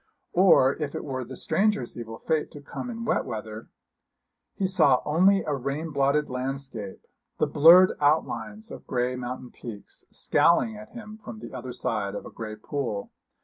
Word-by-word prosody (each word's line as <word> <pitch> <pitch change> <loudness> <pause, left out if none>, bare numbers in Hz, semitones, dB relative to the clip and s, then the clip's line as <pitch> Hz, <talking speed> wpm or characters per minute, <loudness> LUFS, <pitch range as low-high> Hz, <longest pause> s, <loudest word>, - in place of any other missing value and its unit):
Or 175 -7 +6
if 150 -3 -4
it - - -4
were 130 -3 -4
the 130 +1 -9
stranger's 205 - 0
evil 115 -1 -7
fate 155 -1 -1
to 145 - -9
come 145 +11 -7
in 230 -1 -5
wet 225 - +1
weather, 110 -2 -7 0.9
he 195 - -1
saw 160 -9 +4
only 190 +6 +4
a 150 - -2
rain 140 +4 -3
blotted 140 +1 +2
landscape 130 -5 -5 0.3
the - - +2
blurred 175 +5 +7
outlines 210 +9 0
of - - -10
grey 125 0 0
mountain 125 0 -6
peaks, 110 -4 -10
scowling 215 +6 +2
at 215 0 -11
him 215 -2 -10
from 120 - -9
the 120 +4 -10
other 130 0 -6
side 100 -4 -2
of - - -6
a - - -9
grey 110 -1 -6
pool. 110 -2 -4
140 Hz, 170 wpm, -26 LUFS, 120-180 Hz, 0.9 s, blurred